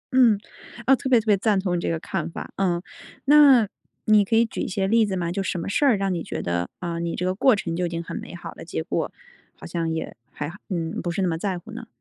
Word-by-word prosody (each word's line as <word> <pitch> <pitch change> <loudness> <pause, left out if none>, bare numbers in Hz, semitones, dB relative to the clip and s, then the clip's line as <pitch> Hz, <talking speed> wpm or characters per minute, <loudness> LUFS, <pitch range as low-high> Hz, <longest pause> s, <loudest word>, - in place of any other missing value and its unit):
嗯， 235 -6 +6 0.5
啊， 270 - +6
特 265 - -4
别 245 -3 +6
特 220 - -7
别 210 -2 +5
赞 205 0 +2
同 185 -2 -1
你 175 - -1
这 - - -1
个 165 -1 -1
看 170 -2 -3
法， - - -7
嗯。 175 -3 +1 0.4
那 275 -6 +7 0.4
你 215 -1 +6
可 225 +3 0
以 230 - +5
举 225 - -5
一 - - -2
些 190 0 -1
例 225 +2 +4
子 195 - -2
吗？ 175 -2 -2
就 195 - -2
什 185 -1 -2
么 170 - -4
事 285 +8 +1
儿 245 -6 +5
让 195 -1 0
你 170 - -2
觉 - - -5
得， 85 0 -2
呃， 170 -1 -3
你 170 0 -2
这 180 - -2
个 185 - +1
过 240 +5 +4
程 170 -4 -3
就 180 +1 0
已 - - -5
经 170 0 -4
很 - - -7
美 - - -8
好 - - -8
了？ - - -10
结 - - -4
果 - - -2 0.4
好 - - -12
像 165 -1 -2
也 160 0 -4 0.2
还 150 +1 -5 0.2
嗯， 170 -4 -2
不 175 - -3
是 175 +3 -1
那 - - +2
么 165 - 0
在 185 +1 -2
乎 175 +6 -11
呢？ 230 +1 -8
190 Hz, 300 characters per minute, -24 LUFS, 170-220 Hz, 0.5 s, 那